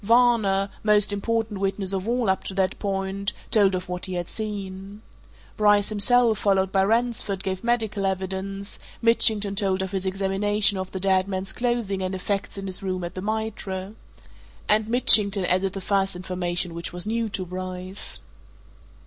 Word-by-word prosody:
Varner 215 -4 +3
most 210 -1 +3
important 220 0 -2
witness 195 0 -1
of 190 +1 -3
all 240 -1 0
up 190 0 0
to 190 - -5
that 190 -1 0
point 195 0 -2 0.2
told 200 -3 +4
of 185 +1 -5
what 180 0 -3
he 185 - -4
had 175 -1 -3
seen. 200 -1 -7 0.5
Bryce 205 -1 +3
himself, 225 +1 +3
followed 195 -2 +1
by 195 -1 +2
Ransford, 225 -3 -1
gave 190 -1 -4
medical 220 -4 0
evidence; 190 +1 -4 0.2
Mitchington 220 -3 +3
told 195 -2 0
of 190 - -5
his 190 -1 -2
examination 195 +1 +2
of 185 0 -5
the 190 - -5
dead 190 0 +2
man's 190 0 -3
clothing 240 -6 -2
and 185 0 -2
effects 195 +2 -3
in 195 - -6
his 190 -1 -4
room 185 -2 -3
at 175 - -5
the 185 - -6
Mitre. 210 -2 -4 0.7
And 215 0 +3
Mitchington 210 -5 +6
added 185 +2 +1
the 195 - -6
first 195 -1 0
information 180 -1 -1
which 170 0 -4
was 175 +1 -2
new 225 +1 -1
to 190 -2 -4
Bryce. 185 +1 -6
195 Hz, 165 wpm, -24 LUFS, 190-210 Hz, 0.7 s, Mitchington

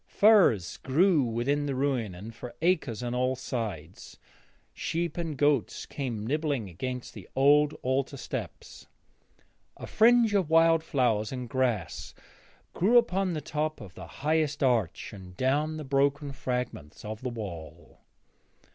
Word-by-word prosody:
Furze 195 - +4
grew 160 +4 +3
within 130 +5 0
the 140 - -2
ruin 130 -8 -1
and 105 +6 -9
for 120 +1 -9
acres 155 - +1
on 120 0 -3
all 125 +1 +1
sides. 105 - -6 0.6
Sheep 170 +1 -2
and 165 -4 -4
goats 145 -4 +1
came 120 -7 -4
nibbling 145 -4 -1
against 125 +8 -5
the - - -11
old 145 +2 +4
altar 135 +2 -1
steps. - - -7 0.9
A - - -7
fringe 230 -1 +4
of 190 -6 +1
wallflower 160 -9 +3
and 125 -2 -5
grass 120 -7 -2 0.6
grew 220 +7 +4
upon 190 -5 +2
the 155 - -3
top 155 +1 -3
of 100 -6 -11
the 90 -2 -10 0.2
highest 155 -2 +1
arch 115 -10 0
and 90 -2 -11
down 150 +4 0
the 155 - -5
broken 140 +1 +1
fragments 125 - -5
of 110 +1 -6
the 130 - -3
wall. 100 -9 -8
135 Hz, 140 wpm, -28 LUFS, 115-155 Hz, 0.9 s, Furze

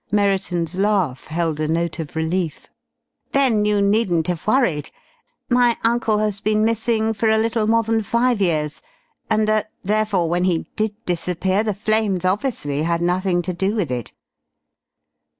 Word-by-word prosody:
Merriton's 190 -4 0
laugh 195 -10 0
held 160 -1 -2
a 155 - 0
note 165 +1 -1
of 160 -1 -6
relief. 160 0 -2 0.6
"Then 250 -7 +3
you 205 -1 +2
needn't 200 -6 +2
have 175 +1 -3
worried. 215 - +1 0.6
My 245 -1 +3
uncle 230 -2 +2
has 210 -2 -1
been 215 +1 +2
missing 225 0 +1
for 220 +1 0
a 220 - +4
little 225 0 0
more 230 +1 +3
than 225 0 0
five 235 +1 +1
years, 155 -5 0 0.5
and 215 0 +2
that, 215 0 +1
therefore, 205 -3 +1
when 175 +2 0
he 175 -3 0
did 215 -1 -1
disappear 180 +3 0
the 210 -3 -2
flames 210 -3 0
obviously 185 - -1
had 170 +1 0
nothing 180 0 +1
to 180 - -3
do 190 +4 -1
with 190 - -1
it!" 120 -3 -4
200 Hz, 155 wpm, -21 LUFS, 170-220 Hz, 0.6 s, a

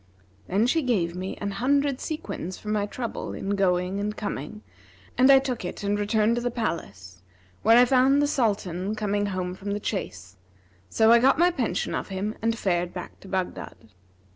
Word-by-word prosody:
'[FN#340] 95 +1 -33
Then 200 +5 +2
she 320 +6 +2
gave 190 - 0
me 185 +1 -5
an 200 -1 -3
hundred 275 +5 +1
sequins 185 - -5
for 210 - -8
my 210 -1 0
trouble 235 +2 -5
in 195 - -4
going 185 -1 +1
and 210 +1 -3
coming 140 - -5 0.5
and 260 +2 +6
I 270 - +9
took 260 -4 -2
it 180 - -6
and 205 +1 0
returned 215 +2 +2
to - - -1
the 245 - 0
palace, 100 - -5 0.4
where 225 +2 +6
I 245 - +7
found 265 +2 +4
the 290 - +3
Sultan 205 - -1
come 210 -2 -2
home 185 -2 -3
from 200 +2 -5
the 205 - -2
chase; 95 - -5 0.5
so 220 0 +4
I 235 - +7
got 265 +3 +4
my 350 +2 +4
pension 260 -9 -2
of - - -3
him 195 +2 -3
and 225 +1 0
fared 175 -3 -1
back 180 - -8
to - - -14
Baghdad. 185 - -5
205 Hz, 190 wpm, -25 LUFS, 180-240 Hz, 0.5 s, I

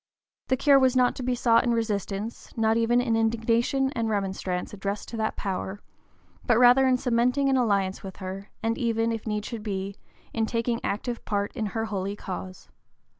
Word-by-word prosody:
The 260 - +2
cure 280 +1 +5
was 260 -1 +3
not 250 -1 +3
to - - -4
be 250 0 0
sought 230 -1 +4
in 240 - +1
resistance, 210 -1 -3
not 220 0 +3
even 230 +1 +3
in 235 -2 +1
indignation 230 +4 +1
and 230 -4 -1
remonstrance 190 -3 -2
addressed 200 0 -4
to 230 - -6
that 220 0 -1
power, 190 0 -3 0.6
but 240 - +3
rather 250 +2 +6
in 255 -1 +4
cementing 250 +3 +2
an 270 - +3
alliance 200 -6 +1
with 190 -1 -8
her, 195 +1 -7
and 225 0 0
even, 230 -1 +1
if 225 -1 -4
need 210 -1 -2
should 230 -3 -5
be, 200 -1 -4 0.4
in 225 -1 0
taking 230 0 -1
active 235 +4 -3
part 205 -1 -2
in 220 -3 -1
her 225 - 0
holy 200 -2 -3
cause. 185 -2 -7
225 Hz, 185 wpm, -26 LUFS, 200-240 Hz, 0.6 s, rather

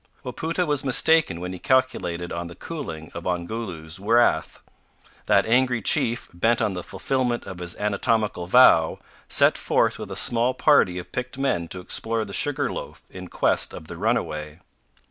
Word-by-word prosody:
Wapoota 165 +8 -2
was 145 -3 +1
mistaken 140 - +3
when 90 +1 -5
he 90 - -8
calculated 130 -11 0
on 85 0 -4
the 85 - -11
cooling 95 - -7
of 85 +1 -7
Ongoloo's 90 -2 -5
wrath. 105 -7 +2 0.7
That - - +4
angry 125 +1 +2
chief, 115 +2 +2
bent 115 +7 +1
on 110 -4 0
the 90 - -5
fulfilment 125 +3 -2
of 95 -2 -8
his 90 -1 -5
anatomical 105 -2 -1
vow, 90 -7 +5 0.3
set - - +4
forth - - +1
with - - -7
a - - -6
small 120 +2 +2
party 130 -12 +3
of 90 - -8
picked 125 +1 -5
men 135 -12 -1
to 90 +2 -6
explore 110 +4 -2
the 100 - -10
Sugar 145 +2 +1
loaf - - -8
in 90 -1 -9
quest - - 0
of 80 - -10
the 85 - -7
runaway. 75 -7 -2
110 Hz, 165 wpm, -23 LUFS, 85-125 Hz, 0.7 s, vow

